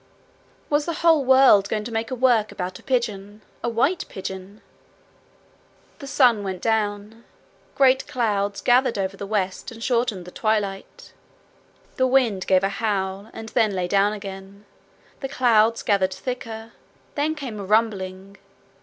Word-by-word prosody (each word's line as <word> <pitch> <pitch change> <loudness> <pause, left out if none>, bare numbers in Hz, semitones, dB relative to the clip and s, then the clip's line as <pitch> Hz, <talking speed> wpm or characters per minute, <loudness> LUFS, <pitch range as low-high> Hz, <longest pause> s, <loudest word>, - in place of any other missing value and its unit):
Was 290 0 +1
the 335 - -1
whole 320 -4 +5
world 260 -7 +5
going 215 -1 -1
to 235 - -7
make 225 0 -2
a 260 - -3
work 240 -4 +2
about 180 0 -5
a - - -16
pigeon 215 -5 -3 0.2
a - - -1
white 270 +10 +1
pigeon? 190 +2 -8 1.4
The 280 - -8
sun 245 -6 +4
went 190 -2 -4
down. 215 0 -1 0.5
Great 265 -1 +3
clouds 205 -4 -1
gathered 250 -1 +3
over 195 0 -2
the 200 0 -7
west, 195 +2 -2
and 230 -1 -10
shortened 235 -7 0
the 180 - -10
twilight. 205 -3 -3 0.8
The 260 - +3
wind 245 -8 +1
gave 185 0 +3
a 195 - +2
howl, 200 -1 -2
and 225 0 -8
then 215 -2 +1
lay 180 -1 -1
down 200 +2 +3
again. 200 0 -9 0.5
The 270 - -5
clouds 230 -4 +3
gathered 190 -2 +1
thicker. 230 -3 -6 0.4
Then 300 +2 -1
came 255 -8 -6
a - - -5
rumbling. 195 -2 -1
215 Hz, 150 wpm, -23 LUFS, 195-245 Hz, 1.4 s, whole